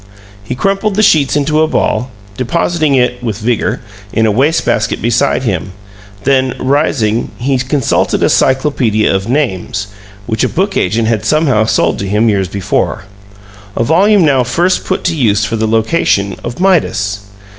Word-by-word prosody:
He 115 +4 -5
crumpled 195 - -1
the 215 - +2
sheets 150 -10 +3
into 150 +1 +1
a 160 - +3
ball, 125 -4 -1 0.3
depositing 155 +4 0
it 125 -1 +1
(with 110 -4 -3
vigor) 115 +1 -1 0.3
in 110 - +1
a 110 - +2
waste 140 +9 +1
basket 110 0 0
beside 120 +3 +1
him; 95 -5 -3 0.5
then, 130 0 +1
rising, 130 -5 0
he 130 +1 -1
consulted 130 0 0
a - - +3
Cyclopedia 130 -6 +1
of 95 +3 -2
Names, 105 -7 -2 0.4
which 110 -1 -1
a - - +1
book 195 +3 -1
agent 110 +5 0
had 110 -2 0
somehow 130 -3 +2
sold 85 -6 +1
to 100 - -3
him 105 +3 +2
years 100 -3 0
before; 95 +1 -2 0.7
a - - +2
volume 185 - +3
now 135 -4 +3
first 170 +10 0
put - - -2
to 170 - 0
use 105 -7 +1
for 110 - -3
the 110 0 -1
location 110 - +1
of 120 +4 -6
"Midas." 115 - +1
125 Hz, 165 wpm, -13 LUFS, 110-150 Hz, 0.7 s, sheets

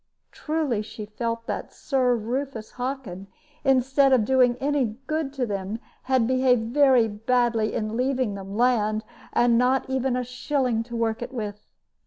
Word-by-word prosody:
Truly 300 -8 -1
she 215 0 -8
felt 230 +2 -4
that - - -4
Sir 255 -3 +1
Rufus 235 0 -4
Hockin, 245 -8 -5 0.4
instead 270 +1 +3
of 245 -5 +4
doing 250 -1 +3
any 270 -6 0
good 310 -2 -2
to 265 -3 -1
them, 200 0 -3 0.3
had 260 -3 +2
behaved 250 -2 +2
very 265 -5 +5
badly 225 +1 0
in 215 +1 -2
leaving 255 -3 0
them 195 +1 -7
land, 220 -3 +2 0.3
and 240 -1 +3
not 255 +2 +2
even 265 -1 0
a 250 - -1
shilling 250 -1 -1
to 235 0 -7
work 225 -1 -1
it 240 - -5
with. 210 -4 -6
245 Hz, 155 wpm, -25 LUFS, 220-265 Hz, 0.4 s, very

